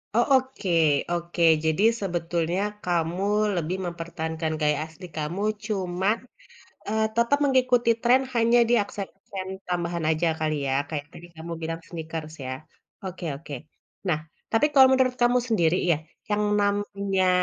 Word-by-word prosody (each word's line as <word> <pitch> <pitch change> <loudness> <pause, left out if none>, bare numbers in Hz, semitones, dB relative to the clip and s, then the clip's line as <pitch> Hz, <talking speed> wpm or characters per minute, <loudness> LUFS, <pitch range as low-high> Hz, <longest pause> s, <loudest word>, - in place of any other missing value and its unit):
Oh, 240 - +4
oke 260 -6 -4 0.4
oke. 170 0 -3 0.2
Jadi 160 +5 +2 0.2
sebetulnya 175 -1 -1 0.2
kamu 175 +1 0 0.3
lebih 175 +2 -1
mempertahankan 165 -2 -4
gaya 150 -1 +2
asli 160 +3 -12
kamu, 155 +6 -3 0.2
cuman, 195 0 0 0.7
eee, 220 +1 +1
tetap 235 +5 +3
mengikuti 255 -3 +3
tren 250 +2 +5
hanya 235 +1 +4
di 240 - +4
akses-aksen 195 -1 -7 0.2
tambahan 170 -2 -2
aja 160 +2 +1
kali 155 -1 0
ya, 135 - +1
kayak 145 -2 -4
tadi 170 - -11
kamu 165 +1 -7
bilang 165 +1 -3
sneakers 160 -2 -6
ya. 130 - -3 0.5
Oke 180 -2 -5
oke. 145 0 -8 0.5
Nah, 155 -4 +2 0.3
tapi 225 +6 +4
kalau 265 -2 +9
menurut 260 -1 +3
kamu 245 +1 +4
sendiri 175 -7 +3
ya, 160 - +3 0.3
yang 210 0 +2 0.2
namanya, 200 -2 0
180 Hz, 140 wpm, -25 LUFS, 165-215 Hz, 0.7 s, kalau